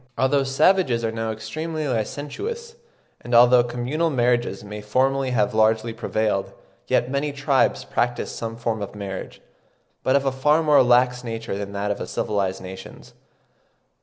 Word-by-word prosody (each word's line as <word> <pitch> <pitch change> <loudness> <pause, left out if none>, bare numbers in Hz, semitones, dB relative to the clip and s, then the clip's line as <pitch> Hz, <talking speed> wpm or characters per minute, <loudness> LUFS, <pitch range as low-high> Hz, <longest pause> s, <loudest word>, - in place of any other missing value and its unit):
Although 135 +1 +2
savages 135 -3 +2
are 110 - -1
now 115 0 -3
extremely 155 +8 -4
licentious, 150 - -4 0.5
and 120 0 -1
although 120 +1 +7
communal 125 +7 -1
marriages 120 -7 0
may 105 0 -7
formerly 130 +5 +1
have 110 -5 +1
largely 110 +1 +2
prevailed, 110 -3 -1 0.3
yet 125 - +1
many 140 +2 -1
tribes 140 -1 +1
practise 120 0 -1
some 115 0 -5
form 115 -2 -2
of 100 - -6
marriage, 100 -2 -7 0.6
but 130 - +2
of 140 0 +2
a 135 - +2
far 150 +5 +2
more 150 -2 +5
lax 125 0 +3
nature 115 -3 -4
than 100 0 -5
that 100 +1 -2
of 100 - -4
civilised 95 -3 -2
nations. 95 +1 -10
120 Hz, 150 wpm, -23 LUFS, 110-140 Hz, 0.6 s, although